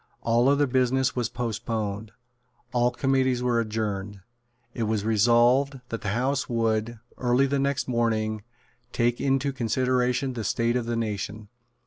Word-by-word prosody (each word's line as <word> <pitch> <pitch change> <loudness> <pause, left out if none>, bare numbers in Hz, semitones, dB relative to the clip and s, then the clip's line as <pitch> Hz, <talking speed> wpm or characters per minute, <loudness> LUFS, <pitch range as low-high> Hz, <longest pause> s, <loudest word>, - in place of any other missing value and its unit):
All 120 +3 +3
other 145 +1 +3
business 130 0 +1
was 120 -3 -1
postponed. 110 -3 -3 0.6
All 120 0 +3
committees 130 -1 +1
were 120 -1 +2
adjourned. 105 -3 -3 0.5
It 115 - -2
was 110 -1 -1
resolved 120 +5 +3
that 115 - -4
the 105 - -3
House 135 +3 0
would, 115 0 0 0.2
early 125 +2 +3
the 140 0 0
next 140 -1 0
morning, 110 -3 0 0.5
take 120 0 0
into 135 0 +1
consideration 130 +1 0
the 115 -2 -4
state 115 +3 0
of 120 -2 -1
the 120 - -1
nation. 105 -1 -4
120 Hz, 140 wpm, -26 LUFS, 110-130 Hz, 0.6 s, All